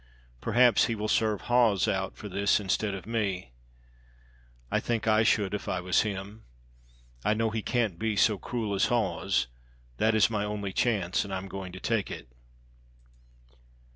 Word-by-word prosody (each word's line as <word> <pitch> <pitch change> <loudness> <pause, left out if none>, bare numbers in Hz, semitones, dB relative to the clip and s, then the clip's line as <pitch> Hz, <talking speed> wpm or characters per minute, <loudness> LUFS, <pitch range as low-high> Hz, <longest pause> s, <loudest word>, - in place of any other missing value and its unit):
Perhaps 120 +1 +4
He 115 - -1
will 105 0 -3
serve 110 -2 +1
Hawes 120 -6 +3
out - - -2
for - - -7
this 100 +1 +2
instead 100 +1 -1
of 95 - -8
me. 100 - -2 1.2
I - - +2
think 115 -2 -2
I 110 0 +4
should 105 -3 +2
if 105 - -4
I 90 - -1
was 90 +1 +2
Him. 105 +1 -5 0.8
I 105 - +2
know 110 0 0
He 110 0 -2
can't 110 -7 -1
be 110 -1 0
so 105 0 +3
cruel 110 -2 -3
as 100 - +2
Hawes; 100 -5 0 0.5
that 110 - +2
is 110 - +5
my 105 -3 -2
only 105 -2 -3
chance, 100 -7 +1
and 100 - -8
I'm 95 0 -4
going 95 -1 -6
to 95 - -8
take 115 -1 -1
it. - - -8
105 Hz, 170 wpm, -28 LUFS, 95-110 Hz, 1.2 s, is